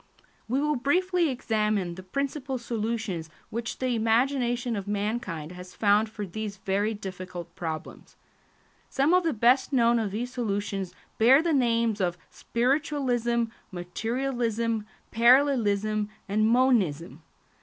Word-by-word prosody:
We 255 Hz, +4 st, 0 dB
will 300 Hz, 0 st, +1 dB
briefly 350 Hz, +5 st, +2 dB
examine 215 Hz, -7 st, 0 dB
the 185 Hz, -, -9 dB
principal 275 Hz, +6 st, -3 dB
solutions 225 Hz, -7 st, -3 dB, 0.2 s
which 235 Hz, +1 st, -4 dB
the 255 Hz, -1 st, 0 dB
imagination 240 Hz, +1 st, +1 dB
of 200 Hz, -1 st, -5 dB
mankind 205 Hz, -6 st, -3 dB
has 180 Hz, 0 st, -10 dB
found 210 Hz, +1 st, +3 dB
for 210 Hz, -1 st, -5 dB
these 205 Hz, +2 st, -5 dB
very 200 Hz, +3 st, -1 dB
difficult 185 Hz, -3 st, -8 dB
problems. 160 Hz, -2 st, -6 dB, 0.7 s
Some 280 Hz, +5 st, +2 dB
of 365 Hz, 0 st, +4 dB
the 330 Hz, -, +1 dB
best 245 Hz, +3 st, +3 dB
known 235 Hz, -3 st, +4 dB
of 215 Hz, -2 st, -1 dB
these 240 Hz, +5 st, -4 dB
solutions 200 Hz, -5 st, -3 dB, 0.2 s
bear 260 Hz, +7 st, +6 dB
the 335 Hz, -2 st, +1 dB
names 230 Hz, -5 st, +2 dB
of 175 Hz, -1 st, 0 dB
spiritualism, 245 Hz, -2 st, 0 dB, 0.3 s
materialism, 230 Hz, +3 st, -2 dB, 0.2 s
parallelism, 220 Hz, -4 st, +3 dB, 0.2 s
and 215 Hz, +2 st, +2 dB
monism. 195 Hz, -, +2 dB
225 Hz, 125 wpm, -27 LUFS, 200-255 Hz, 0.7 s, bear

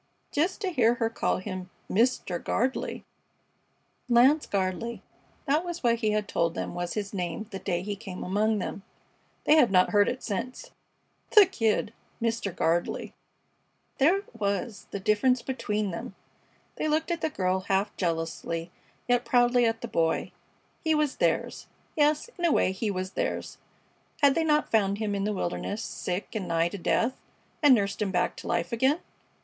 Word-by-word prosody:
Just 345 Hz, +8 st, 0 dB
to 385 Hz, -3 st, -1 dB
hear 240 Hz, -6 st, +3 dB
her 230 Hz, -2 st, -1 dB
call -, -, 0 dB
him 185 Hz, 0 st, -6 dB, 0.2 s
"Mr. 225 Hz, -5 st, +1 dB
Gardley"! 260 Hz, +2 st, -1 dB, 1.1 s
Lance 260 Hz, +6 st, +5 dB
Gardley, 200 Hz, +4 st, -2 dB, 0.4 s
that 300 Hz, +3 st, +2 dB
was 345 Hz, -3 st, -5 dB
what 235 Hz, -1 st, +3 dB
he 220 Hz, -2 st, 0 dB
had 210 Hz, -1 st, 0 dB
told 170 Hz, 0 st, 0 dB
them -, -, -3 dB
was 175 Hz, -1 st, -3 dB
his 205 Hz, -1 st, -3 dB
name 180 Hz, +2 st, -3 dB
the 195 Hz, -, -5 dB
day 175 Hz, -2 st, -2 dB
he 205 Hz, +1 st, -3 dB
came 195 Hz, -3 st, -7 dB
among 210 Hz, +3 st, +1 dB
them. 200 Hz, 0 st, -4 dB, 0.6 s
They 305 Hz, -, +5 dB
had 260 Hz, -7 st, +6 dB
not 185 Hz, -1 st, +4 dB
heard 205 Hz, -1 st, +4 dB
it 250 Hz, -, -5 dB
since. 250 Hz, -, -4 dB, 0.6 s
The 420 Hz, -2 st, +10 dB
Kid! 225 Hz, -, 0 dB, 0.3 s
Mr. 230 Hz, -3 st, -1 dB
Gardley! 170 Hz, +1 st, 0 dB, 0.9 s
There 325 Hz, +8 st, +5 dB
it 400 Hz, -, -10 dB
was, 200 Hz, +1 st, -2 dB
the 200 Hz, -, -4 dB
difference 235 Hz, +6 st, +2 dB
between 210 Hz, -6 st, -2 dB
them! 170 Hz, +3 st, -6 dB, 0.6 s
They -, -, -1 dB
looked 315 Hz, +3 st, 0 dB
at 340 Hz, -1 st, -2 dB
the 315 Hz, -, +1 dB
girl 185 Hz, -8 st, 0 dB
half 195 Hz, +2 st, +1 dB
jealously, 165 Hz, -1 st, -2 dB, 0.4 s
yet 245 Hz, 0 st, +3 dB
proudly 245 Hz, 0 st, +4 dB
at 225 Hz, 0 st, -1 dB
the 235 Hz, -, -4 dB
Boy. 165 Hz, -6 st, 0 dB, 0.5 s
He 320 Hz, -1 st, +3 dB
was 300 Hz, -2 st, 0 dB
theirs -, -, 0 dB, 0.3 s
yes, 300 Hz, +3 st, +2 dB
in -, -, -4 dB
a 335 Hz, -, +4 dB
way 185 Hz, -, +3 dB
he 200 Hz, +3 st, -2 dB
was 185 Hz, -1 st, -3 dB
theirs -, -, -3 dB, 0.6 s
had 280 Hz, -1 st, +7 dB
they 330 Hz, -, +1 dB
not 300 Hz, -1 st, +2 dB
found 200 Hz, -3 st, +2 dB
him 210 Hz, -1 st, -2 dB
in 200 Hz, 0 st, -1 dB
the 210 Hz, -, 0 dB
wilderness, 200 Hz, +3 st, -3 dB
sick 180 Hz, -2 st, -4 dB
and 205 Hz, -5 st, -3 dB
nigh 165 Hz, 0 st, +1 dB
to 200 Hz, -, -7 dB
death, 230 Hz, +8 st, +1 dB, 0.5 s
and 290 Hz, -4 st, +7 dB
nursed 200 Hz, -1 st, -1 dB
him 205 Hz, -, +1 dB
back 180 Hz, -2 st, 0 dB
to -, -, -8 dB
life 170 Hz, -, -1 dB
again? 265 Hz, +7 st, +2 dB
215 Hz, 175 wpm, -28 LUFS, 190-260 Hz, 1.1 s, The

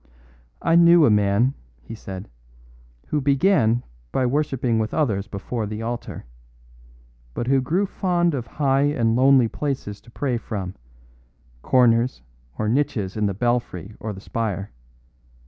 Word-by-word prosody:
"I 165 Hz, -, +3 dB
knew 170 Hz, -1 st, +7 dB
a 115 Hz, -, +4 dB
man," 105 Hz, +5 st, +2 dB, 0.3 s
he 65 Hz, -, -9 dB
said, 95 Hz, -3 st, -8 dB, 0.8 s
"who 150 Hz, -, 0 dB
began 135 Hz, -, +3 dB, 0.3 s
by 130 Hz, -, +1 dB
worshipping 130 Hz, -4 st, 0 dB
with 110 Hz, 0 st, -2 dB
others 105 Hz, -10 st, 0 dB
before 105 Hz, +2 st, -4 dB
the 110 Hz, +2 st, -5 dB
altar, 120 Hz, -, -5 dB, 1.1 s
but 120 Hz, -, -2 dB
who 135 Hz, +1 st, +2 dB
grew 170 Hz, +10 st, 0 dB
fond 175 Hz, -3 st, 0 dB
of 125 Hz, -4 st, -4 dB
high 135 Hz, +1 st, +1 dB
and 120 Hz, -6 st, +1 dB
lonely 130 Hz, -1 st, +5 dB
places 130 Hz, -6 st, -4 dB
to 120 Hz, -, -18 dB
pray 125 Hz, 0 st, -2 dB
from, 95 Hz, -5 st, -5 dB, 0.9 s
corners 120 Hz, -, +2 dB, 0.3 s
or 110 Hz, -, -1 dB
niches 110 Hz, -6 st, 0 dB
in 105 Hz, -1 st, 0 dB
the 100 Hz, -, -2 dB
belfry 115 Hz, -4 st, -2 dB
or 110 Hz, -, -4 dB
the 95 Hz, -1 st, -9 dB
spire. 105 Hz, -3 st, -3 dB
120 Hz, 140 wpm, -23 LUFS, 105-140 Hz, 1.1 s, knew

